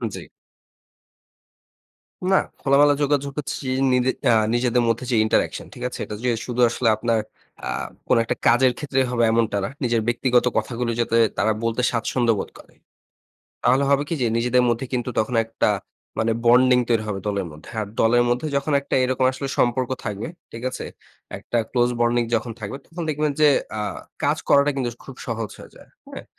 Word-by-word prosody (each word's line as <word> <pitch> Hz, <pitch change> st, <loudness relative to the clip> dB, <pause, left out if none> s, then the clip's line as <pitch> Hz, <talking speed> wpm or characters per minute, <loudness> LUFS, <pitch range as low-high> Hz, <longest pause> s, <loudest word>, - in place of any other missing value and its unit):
জ্বি। -, -, -7 dB, 2.1 s
না, 190 Hz, -, +5 dB, 0.2 s
খোলামেলা 145 Hz, +1 st, +5 dB
যোগাযোগ 140 Hz, -1 st, 0 dB
হচ্ছে 135 Hz, -1 st, -5 dB, 0.2 s
নিজে 125 Hz, 0 st, +2 dB, 0.2 s
আ -, -, +5 dB, 0.2 s
নিজেদের 120 Hz, 0 st, +2 dB
মধ্যে 115 Hz, +2 st, 0 dB
যে 120 Hz, -, +2 dB
interaction 110 Hz, -, 0 dB
ঠিক 125 Hz, -, -9 dB
আছে? -, -, -8 dB
এটা 105 Hz, -, -6 dB
যে 125 Hz, -, +3 dB, 0.2 s
শুধু 125 Hz, 0 st, -2 dB
আসলে 120 Hz, 0 st, -1 dB
আপনার 115 Hz, -1 st, 0 dB, 0.5 s
আ -, -, -3 dB, 0.4 s
কোনো -, -, +4 dB
একটা -, -, -2 dB
কাজের 125 Hz, +1 st, +4 dB
ক্ষেত্রে 135 Hz, -2 st, 0 dB
হবে 120 Hz, -1 st, +1 dB
এমনটা 115 Hz, -3 st, +1 dB
না। -, -, -2 dB
নিজের 120 Hz, -2 st, +1 dB
ব্যক্তিগত 120 Hz, +1 st, +2 dB
কথাগুলি 115 Hz, +2 st, -1 dB
যাতে 115 Hz, 0 st, +1 dB, 0.2 s
তারা 110 Hz, +2 st, +2 dB
বলতে 115 Hz, +2 st, 0 dB
স্বাচ্ছন্দ্য 115 Hz, 0 st, +1 dB
বোধ -, -, -4 dB
করে। -, -, -17 dB, 0.9 s
তাহলে 135 Hz, +3 st, +3 dB
হবে 140 Hz, 0 st, +3 dB
কি -, -, -1 dB
যে, 120 Hz, -, +2 dB
নিজেদের 125 Hz, +2 st, +2 dB
মধ্যে 120 Hz, +2 st, 0 dB
কিন্তু 125 Hz, 0 st, -1 dB
তখন 110 Hz, +3 st, 0 dB
একটা 115 Hz, -1 st, 0 dB, 0.5 s
মানে 115 Hz, 0 st, +1 dB
বন্ডিং 125 Hz, +1 st, +6 dB
তৈরি 115 Hz, -2 st, +2 dB
হবে 95 Hz, -2 st, -3 dB
দলের 100 Hz, -3 st, -1 dB
মধ্যে। 75 Hz, +2 st, -13 dB
আর 105 Hz, -, -3 dB
দলের 120 Hz, +2 st, +4 dB
মধ্যে 125 Hz, +5 st, 0 dB
যখন 140 Hz, +2 st, -1 dB
একটা 140 Hz, -, -4 dB
এরকম 130 Hz, 0 st, 0 dB
আসলে 135 Hz, +1 st, -5 dB
সম্পর্ক 125 Hz, +1 st, +1 dB
থাকবে, 105 Hz, 0 st, -4 dB, 0.2 s
ঠিক 115 Hz, +1 st, -8 dB
আছে? -, -, -6 dB, 0.5 s
একটা 120 Hz, -, -2 dB
ক্লোজ 120 Hz, -1 st, +2 dB
বন্ডিং 120 Hz, 0 st, +3 dB
যখন 115 Hz, +1 st, -1 dB
থাকবে -, -, -5 dB
তখন 170 Hz, +1 st, -7 dB
দেখবেন 150 Hz, 0 st, 0 dB
যে 150 Hz, -, +7 dB, 0.3 s
আ -, -, -2 dB, 0.4 s
কাজ -, -, +2 dB
করাটা 140 Hz, +1 st, +5 dB
কিন্তু 125 Hz, -3 st, -1 dB, 0.2 s
খুব 135 Hz, -, -10 dB
সহজ 115 Hz, -3 st, -3 dB
হয়ে -, -, -12 dB
যায়। -, -, -16 dB, 0.2 s
হ্যাঁ? -, -, -9 dB
120 Hz, 175 wpm, -22 LUFS, 115-130 Hz, 2.1 s, যে